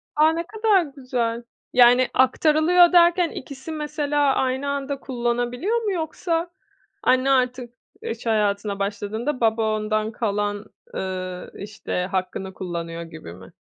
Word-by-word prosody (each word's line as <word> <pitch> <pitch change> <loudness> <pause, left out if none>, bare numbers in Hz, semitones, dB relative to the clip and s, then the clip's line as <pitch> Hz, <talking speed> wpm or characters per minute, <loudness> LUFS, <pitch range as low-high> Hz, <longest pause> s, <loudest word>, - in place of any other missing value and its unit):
A, 305 +1 +5
ne 335 - -2
kadar 430 -3 +3
güzel! 250 -5 -3 0.3
Yani, 245 +1 +6
aktarılıyor 315 +7 +4
derken, 345 0 +5
ikisi 275 +3 -8
mesela 295 -2 0
aynı 265 +2 0
anda 280 0 -3
kullanabiliyor 245 - -1
mu, 415 - 0
yoksa 335 0 -2 0.5
anne 255 +2 +3
artık 250 -2 0 0.3
iş 225 +1 -6
hayatına 205 -2 0
başladığında, 215 +7 -3
baba 220 -1 +2
ondan 215 +1 -1
kalan, 205 -2 -2 0.3
ııı, 185 -1 -5
işte, 200 -3 -4
hakkını 190 0 -3
kullanıyor 170 -2 -5
gibi 160 - -10
mi? 95 +1 -14
245 Hz, 125 wpm, -23 LUFS, 205-295 Hz, 0.5 s, Yani